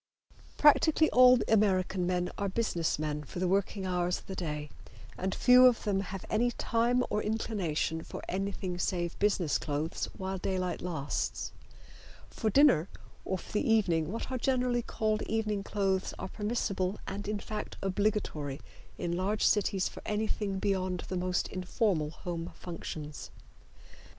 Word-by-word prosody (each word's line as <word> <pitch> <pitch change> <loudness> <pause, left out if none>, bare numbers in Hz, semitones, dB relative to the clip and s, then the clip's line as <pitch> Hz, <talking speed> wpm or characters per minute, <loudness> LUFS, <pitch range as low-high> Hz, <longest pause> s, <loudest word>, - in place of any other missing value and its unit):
Practically 315 +1 +5
all 250 0 +8
American 190 -4 +2
men 180 0 0
are 200 -1 -1
business 185 -6 0
men 150 0 -2
for 150 - -10
the 180 +1 +1
working 195 +1 0
hours 180 -1 0
of - - -13
the 190 - -6
day, 150 -4 -4 0.4
and 190 +1 -2
few 250 0 +7
of 245 -2 +2
them 200 -2 +1
have 195 -1 -5
any 235 +3 +2
time 240 +1 +1
or 210 - +1
inclination 190 -7 -1
for - - -8
anything 190 -1 -3
save 175 -2 -1
business 195 -6 +2
clothes 150 +2 -2
while 190 0 -3
daylight 185 -1 -2
lasts. 155 -6 -2 0.8
For 220 - -1
dinner 230 - +5 0.4
or 190 - -1
for - - -12
the 215 +2 +1
evening 175 -7 +2
what 230 +4 -4
are 255 - -1
generally 250 -1 +1
called 215 -2 -1
evening 215 -2 0
clothes 195 -2 -1
are 190 - -5
permissible, 205 -3 -1
and 200 +1 -5
in 210 0 -1
fact 210 +1 -6
obligatory 190 -8 -1 0.4
in 170 0 -2
large 200 +4 0
cities 195 -2 +2
for - - -9
anything 210 -2 -1
beyond 185 -2 -1
the 185 - -2
most 180 0 0
informal 185 -3 0
home 170 +2 -5
functions. 155 -3 -7
190 Hz, 150 wpm, -31 LUFS, 175-215 Hz, 0.8 s, all